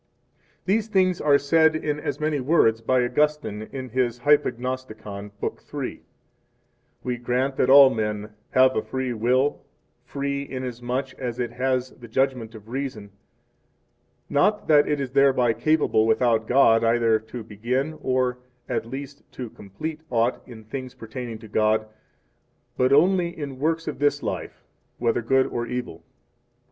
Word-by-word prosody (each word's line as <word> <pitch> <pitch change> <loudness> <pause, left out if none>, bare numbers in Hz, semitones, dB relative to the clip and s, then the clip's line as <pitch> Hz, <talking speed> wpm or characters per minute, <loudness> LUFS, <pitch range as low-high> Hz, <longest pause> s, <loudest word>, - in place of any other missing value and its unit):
These 210 +3 +1
things 185 -4 +2
are 145 -1 +5
said 160 +2 +3
in 150 -1 -2
as 150 -1 -4
many 155 -1 0
words 125 -5 +3
by 125 +2 +2
Augustine 140 -5 -1
in 130 -2 -6
his 120 0 -1
Hypognosticon, 125 -7 -1
Book - - -4
III: - - -5 1.0
We 125 -1 -2
grant 125 +3 -1
that 130 - +2
all 135 -1 +9
men 105 -1 -3 0.2
have 130 0 +4
a - - +1
free 130 -1 -3
will, 125 +5 +1 0.4
free, 140 0 -3
inasmuch 130 +1 -4
as 125 -2 -4
it 120 -2 -2
has 130 +1 -1
the 120 - -13
judgment 125 -2 -1
of 110 -1 -12
reason; 120 -5 -5 1.2
not 205 +9 +1
that 145 -2 +5
it 150 -1 0
is 135 -2 -3
thereby 130 -3 +4
capable, 115 -3 +2
without 115 -1 +2
God, 120 -3 +5
either 115 -1 +3
to 110 +2 -8
begin, 125 +9 -3
or, 130 -2 0 0.3
at 115 -2 -2
least, 140 +3 -7
to 125 -4 -7
complete 155 +11 -7
aught 120 0 +1
in 115 -3 -11
things 130 +3 -7
pertaining 115 0 -7
to 110 0 -12
God, 110 +1 +1 0.9
but 130 +1 +2
only 175 +3 +3
in 140 -4 -6
works 165 +2 0
of 150 - -4
this 145 0 +1
life, - - -5 0.3
whether 120 0 0
good 130 +3 +3
5 - - -7
or 120 0 -2
evil. 125 0 -5
130 Hz, 150 wpm, -24 LUFS, 115-140 Hz, 1.2 s, all